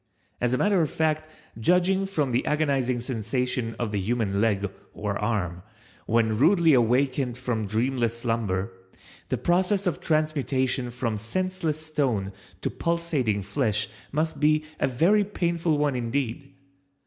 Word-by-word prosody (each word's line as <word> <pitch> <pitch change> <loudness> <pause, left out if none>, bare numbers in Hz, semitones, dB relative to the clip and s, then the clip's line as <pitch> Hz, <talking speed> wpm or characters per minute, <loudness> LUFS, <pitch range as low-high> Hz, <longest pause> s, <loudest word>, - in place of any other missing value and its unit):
As 120 0 +2
a 130 - +2
matter 200 +1 +3
of 155 - +1
fact, 155 -1 0 0.3
judging 180 - +3
from 150 -9 0
the 120 - +1
agonizing 135 -5 +1
sensation 120 0 -2
of 115 -3 -2
the 105 - -1
human 100 -1 0
leg 100 -3 +1 0.3
(or 105 -1 -2
arm) 100 -6 -1 0.5
when 110 -1 +2
rudely 165 +1 +5
awakened 125 +1 +2
from 120 -4 -2
dreamless 115 +2 0
slumber, 110 -6 -1 0.6
the - - 0
process 190 +3 +1
of 180 - 0
transmutation 140 -5 0
from 120 -3 -2
senseless 170 - -2
stone 135 -11 -1 0.3
to - - -1
pulsating 155 -12 0
flesh 105 +2 0 0.2
must 155 0 -1
be 155 +1 +3
a - - +2
very 170 +12 +3
painful 170 -5 0
one 145 -2 +1
indeed. 125 +2 -2
130 Hz, 135 wpm, -26 LUFS, 115-155 Hz, 0.6 s, rudely